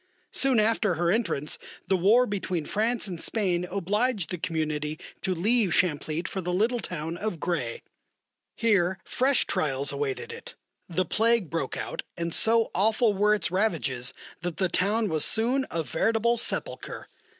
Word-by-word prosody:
Soon 265 -4 +3
after 215 -3 +2
her 170 +1 +1
entrance 170 -9 -1 0.3
the 195 - +3
war 210 +8 +5
between 185 -6 -3
France 225 +3 0
and 180 -5 -5
Spain 180 -5 0
obliged 200 - -1
the 180 - -3
Community 155 -2 -2 0.2
to 185 -1 -1
leave 205 0 +2
Champlitte 160 -1 0
for 190 - -4
the 180 0 -3
little 225 +7 +1
town 165 -4 -5
of 195 -3 -3
Gray. 140 -11 -2 0.7
Here 195 -5 +2
fresh 265 +1 +2
trials 140 -2 0
awaited 140 -2 -3
it; - - -10 0.3
the 180 +2 0
plague 225 -1 +2
broke 165 - -2
out, - - -4 0.2
and 170 -1 -2
so 230 0 +4
awful 215 +3 +3
were 210 +2 +3
its 205 - -2
ravages 155 - 0 0.3
that 175 -2 -4
the 185 -2 +1
town 210 +5 +1
was 160 -4 0
soon 250 +4 +2
a 165 -1 -2
veritable 225 +9 +1
sepulchre. 235 - -3
185 Hz, 155 wpm, -27 LUFS, 165-220 Hz, 0.7 s, war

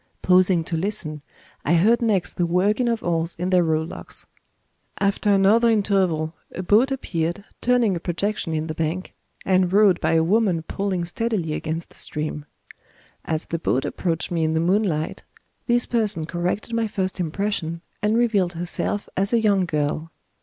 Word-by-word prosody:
Pausing 180 -2 +4
to 165 - -3
listen, 160 -4 -2 0.4
I 170 - +2
heard 220 +8 +4
next 210 -6 +1
the 175 - 0
working 205 +8 +2
of 230 -1 -1
oars 165 -1 0
in 180 +2 -2
their 180 -1 +4
rowlocks. 160 0 -2 0.7
After 200 +1 +1
another 205 +4 +4
interval 190 -7 +1 0.2
a 185 - -4
boat 220 +9 +4
appeared, 175 -7 -2 0.2
turning 240 -5 +3
a - - -3
projection 175 -1 -2
in 155 0 -1
the 160 - -4
bank, 165 +4 -3 0.3
and 185 -1 +2
rowed 200 -3 +4
by - - +1
a 160 0 +4
woman 185 -2 +2
pulling 185 0 -2
steadily 180 -3 -2
against 160 +2 -4
the - - -19
stream. 150 -1 -4 0.8
As 160 0 -2
the 165 - -3
boat 135 -4 0
approached 170 -2 -1
me 165 -2 0
in 160 0 +1
the - - +2
moonlight, 175 -3 0 0.5
this 240 -1 +2
person 210 -9 0
corrected 180 +7 -3
my 230 -1 +1
first 190 -2 -2
impression, 170 -1 -2 0.2
and 210 +2 +2
revealed 205 -7 +2
herself 175 +4 -3
as 195 +4 +1
a 235 - +5
young 200 -4 +2
girl. 155 +1 -1
180 Hz, 165 wpm, -23 LUFS, 165-210 Hz, 0.8 s, a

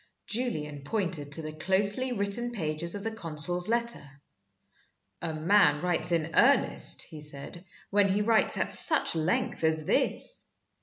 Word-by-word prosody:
Julian 155 - -4
pointed 170 -5 -4
to 160 - -3
the 155 - -6
closely 200 +10 0
written 240 +2 -1
pages 165 -3 -4
of 200 - -6
the 225 - -3
consul's 175 -3 +2
letter. 230 -12 -3 1.0
"A 165 - -3
man 155 -1 +2
writes 175 -1 +1
in 165 -1 -1
earnest," 275 +9 +3
he 155 -3 -11
said, 150 +4 -6 0.3
"when 200 0 +3
he 200 +2 0
writes 225 0 +2
at - - -1
such 315 - +4
length 165 +1 -2
as 160 -1 +2
this. - - +1
175 Hz, 145 wpm, -28 LUFS, 155-210 Hz, 1.0 s, such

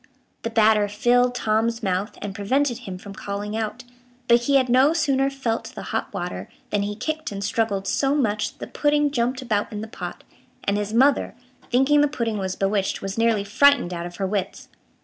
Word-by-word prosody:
The 230 - -3
batter 215 -2 +4
filled 245 +4 +2
Tom's 230 +1 0
mouth, 190 +2 -1
and 205 -1 -4
prevented 240 +5 0
him 195 -7 -7
from 195 +2 -10
calling 205 +2 -5
out, 225 +2 -3 0.4
but 235 0 +4
he 280 - +2
had 260 -2 +4
no 260 +5 +4
sooner 275 -4 +2
felt 260 -5 -2
the - - -8
hot - - -2
water, - - -5 0.2
than 205 - +1
he 205 +1 -3
kicked 315 +5 -3
and 200 0 -5
struggled 200 -2 0
so 275 +7 +1
much 215 -7 0
that - - -30
the - - -14
pudding 295 0 +3
jumped 255 0 -1
about 210 -4 -1
in 210 -1 -5
the 220 - -6
pot, 220 - -7 0.4
and 200 - +1
his 205 0 -2
mother, 265 +3 +3 0.4
thinking 270 +4 +4
the 295 - +4
pudding 230 -7 -2
was 190 -1 -2
bewitched, 195 0 -1
was 195 0 -3
nearly 230 -3 +2
frightened 215 -2 +4
out 170 0 -4
of 175 - -11
her 195 - -2
wits. 195 0 -3
225 Hz, 200 wpm, -23 LUFS, 205-260 Hz, 0.4 s, batter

